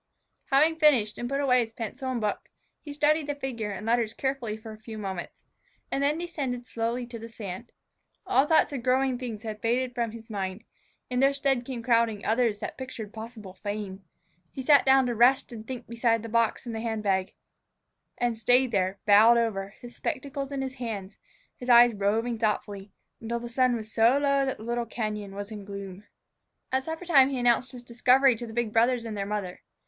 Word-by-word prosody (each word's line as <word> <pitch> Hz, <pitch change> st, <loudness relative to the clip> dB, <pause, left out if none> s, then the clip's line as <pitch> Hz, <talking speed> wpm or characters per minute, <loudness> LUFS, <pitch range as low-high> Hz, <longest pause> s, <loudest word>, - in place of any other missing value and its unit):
Having 310 Hz, +4 st, +3 dB
finished, 255 Hz, -9 st, +3 dB
and 240 Hz, -, -3 dB
put 275 Hz, +1 st, -1 dB
away 255 Hz, -3 st, +4 dB
his 225 Hz, -2 st, -2 dB
pencil 250 Hz, +4 st, -5 dB
and 250 Hz, -, -1 dB
book, 210 Hz, -2 st, -3 dB, 0.3 s
he 295 Hz, -, -8 dB
studied 295 Hz, +1 st, +2 dB
the 290 Hz, -, -2 dB
figure 250 Hz, -6 st, -4 dB
and 205 Hz, +1 st, -6 dB
letters 230 Hz, -1 st, +1 dB
carefully 265 Hz, -5 st, -2 dB
for 220 Hz, 0 st, -10 dB
a 215 Hz, -, -13 dB
few 220 Hz, 0 st, -9 dB
moments, 190 Hz, -4 st, -6 dB, 0.5 s
and 275 Hz, -, 0 dB
then 290 Hz, +2 st, +2 dB
descended 280 Hz, -8 st, -4 dB
slowly 235 Hz, +1 st, -2 dB
to 235 Hz, -1 st, -8 dB
the 230 Hz, +1 st, -9 dB
sand. 215 Hz, 0 st, -8 dB, 0.5 s
All 330 Hz, -7 st, +3 dB
thoughts 315 Hz, -2 st, +3 dB
of 265 Hz, -, -3 dB
growing 255 Hz, 0 st, +1 dB
things 230 Hz, -4 st, -6 dB
had 215 Hz, -1 st, -6 dB
faded 245 Hz, +2 st, 0 dB
from 235 Hz, -1 st, -1 dB
his 225 Hz, 0 st, -11 dB
mind; 195 Hz, 0 st, -4 dB, 0.5 s
in 250 Hz, -, 0 dB
their 275 Hz, +1 st, +4 dB
stead 270 Hz, -3 st, 0 dB
came 245 Hz, -3 st, -5 dB
crowding 230 Hz, -4 st, +2 dB
others 225 Hz, -1 st, +2 dB
that -, -, -7 dB
pictured 230 Hz, -5 st, -7 dB
possible 220 Hz, -3 st, -9 dB
fame. 200 Hz, 0 st, -6 dB, 0.5 s
He 265 Hz, -, -6 dB
sat 280 Hz, 0 st, +5 dB
down 265 Hz, 0 st, +6 dB
to 245 Hz, -, -1 dB
rest 245 Hz, +4 st, +4 dB
and 220 Hz, -1 st, -9 dB
think 250 Hz, -2 st, -6 dB
beside 230 Hz, -1 st, +1 dB
the 230 Hz, -, -6 dB
box 230 Hz, +2 st, +1 dB
and 235 Hz, -, -5 dB
the 220 Hz, -, -4 dB
hand 220 Hz, -2 st, -3 dB
bag, 190 Hz, -2 st, 0 dB, 0.8 s
and 240 Hz, -2 st, -1 dB
stayed 245 Hz, +3 st, +4 dB
there, 190 Hz, -2 st, 0 dB
bowed 215 Hz, +3 st, +7 dB
over, 200 Hz, -4 st, -1 dB
his 240 Hz, 0 st, -10 dB
spectacles 275 Hz, +1 st, -4 dB
in 275 Hz, -1 st, -2 dB
his 265 Hz, -1 st, -4 dB
hands, 205 Hz, -4 st, -5 dB, 0.4 s
his 250 Hz, -, -7 dB
eyes 240 Hz, 0 st, +8 dB
roving 220 Hz, +3 st, 0 dB
thoughtfully, 205 Hz, -2 st, -2 dB, 0.3 s
until 235 Hz, +1 st, -3 dB
the 240 Hz, 0 st, -7 dB
sun 255 Hz, 0 st, +2 dB
was 220 Hz, -1 st, -6 dB
so 230 Hz, +4 st, +4 dB
low 280 Hz, -1 st, +2 dB
that 265 Hz, -, -2 dB
the 215 Hz, -, -11 dB
little 235 Hz, 0 st, -2 dB
cañon 210 Hz, -3 st, -4 dB
was 200 Hz, +2 st, -6 dB
in 210 Hz, -2 st, -7 dB
gloom. 200 Hz, 0 st, -8 dB, 0.7 s
At 260 Hz, 0 st, 0 dB
suppertime 320 Hz, -5 st, +3 dB
he 270 Hz, -, -2 dB
announced 245 Hz, +1 st, +2 dB
his 250 Hz, -2 st, -10 dB
discovery 250 Hz, +2 st, +4 dB
to 240 Hz, +1 st, -6 dB
the 220 Hz, -, -9 dB
big 230 Hz, -2 st, -1 dB
brothers 235 Hz, +1 st, +2 dB
and 220 Hz, -2 st, -5 dB
their 200 Hz, -1 st, -3 dB
mother. 200 Hz, -3 st, -4 dB
235 Hz, 205 wpm, -27 LUFS, 215-260 Hz, 0.8 s, eyes